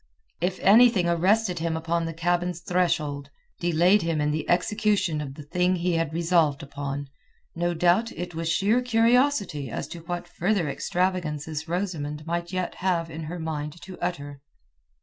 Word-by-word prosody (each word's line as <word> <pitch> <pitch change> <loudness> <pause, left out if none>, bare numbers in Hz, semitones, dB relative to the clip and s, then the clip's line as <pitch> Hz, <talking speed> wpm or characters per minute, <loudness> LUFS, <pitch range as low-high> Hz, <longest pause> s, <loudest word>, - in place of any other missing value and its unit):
If 180 +1 -1
anything 215 -2 +6
arrested 180 +2 +2
him 165 0 -1
upon 165 +1 -1
the 165 - -4
cabin's 175 +1 0
threshold, 155 -6 0 0.3
delayed 175 +4 +4
him 165 -2 -1
in 150 0 +1
the 155 +1 -3
execution 195 -3 +1
of 135 -2 -6
the 150 - -9
thing 180 +5 +1
he 175 0 0
had 165 -2 0
resolved 165 -3 +2
upon, 140 0 -5 0.5
no 175 +1 0
doubt 180 +7 +3
it 175 +1 -6
was 165 0 -3
sheer 205 +8 +2
curiosity 230 - +2
as - - -4
to 170 - -7
what 175 +1 -5
further 185 -2 0
extravagances 160 -2 -2
Rosamund 160 -5 -3
might 170 +1 -3
yet 185 -1 -2
have 170 -3 0
it - - -9
in 160 +1 -6
her 170 +3 -5
mind 155 -1 -4
to 185 0 -10
utter. 145 -5 -4
170 Hz, 165 wpm, -26 LUFS, 155-185 Hz, 0.5 s, anything